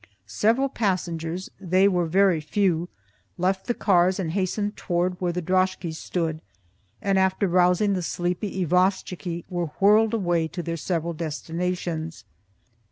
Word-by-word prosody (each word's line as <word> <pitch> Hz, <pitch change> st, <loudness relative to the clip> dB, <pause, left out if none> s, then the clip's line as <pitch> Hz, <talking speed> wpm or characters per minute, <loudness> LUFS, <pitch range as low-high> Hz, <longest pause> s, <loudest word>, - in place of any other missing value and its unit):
Several 235 Hz, +6 st, +2 dB
passengers 180 Hz, -6 st, -2 dB
(they 185 Hz, +1 st, +3 dB
were 180 Hz, -3 st, +1 dB
very 185 Hz, -1 st, +3 dB
few) 175 Hz, +1 st, 0 dB, 0.5 s
left 190 Hz, +2 st, 0 dB
the 240 Hz, -, 0 dB
cars 185 Hz, -1 st, +3 dB
and 170 Hz, -4 st, -2 dB
hastened 205 Hz, +3 st, -1 dB
towards 180 Hz, +1 st, -1 dB
where 175 Hz, -1 st, +1 dB
the 180 Hz, 0 st, -3 dB
droskies 185 Hz, -2 st, 0 dB
stood, 160 Hz, -3 st, -2 dB, 0.6 s
and 195 Hz, -1 st, +2 dB
after 190 Hz, +1 st, +2 dB
rousing 180 Hz, +3 st, +3 dB
the 185 Hz, -, -1 dB
sleepy 180 Hz, +2 st, -2 dB
isvostchiky, 180 Hz, -1 st, 0 dB
were 175 Hz, -2 st, -2 dB
whirled 215 Hz, +3 st, +5 dB
away 175 Hz, -6 st, +1 dB
to 175 Hz, +2 st, -6 dB
their 165 Hz, 0 st, -3 dB
several 170 Hz, 0 st, -2 dB
destinations. 165 Hz, -2 st, -4 dB
180 Hz, 135 wpm, -25 LUFS, 170-190 Hz, 0.6 s, whirled